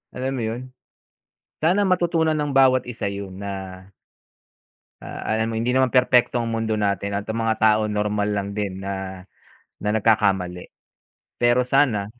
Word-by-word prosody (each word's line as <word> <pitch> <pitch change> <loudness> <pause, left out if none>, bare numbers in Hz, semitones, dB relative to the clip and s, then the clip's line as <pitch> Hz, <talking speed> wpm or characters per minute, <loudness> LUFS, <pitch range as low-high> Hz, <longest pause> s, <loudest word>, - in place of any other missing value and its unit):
Alam 130 +1 -2
mo 130 -2 -3
yun? 115 +3 -4 1.0
Sana 190 +5 +3
matutunan 170 -3 +2
ng 150 -1 -1
bawat 130 -1 +4
isa 120 -4 -4
yun 100 -1 -6
na 95 -2 -7 1.2
ah, - - -7
alam 110 +1 0
mo - - -4
hindi 120 +2 0
naman 130 0 +3
perpekto 125 -1 +3
ang 115 -1 -2
mundo 115 -1 -1
natin 100 -1 -1
at 100 - -3
mga 110 0 0
tao 110 0 +4
normal 105 0 -1
lang 100 0 -2
din 100 -2 -4
na 95 -1 -5 0.6
na 105 - -1
nagkakamali. 95 -5 +1 0.7
Pero 120 +1 +3
sana, 125 -5 +2
110 Hz, 150 wpm, -23 LUFS, 100-125 Hz, 1.2 s, bawat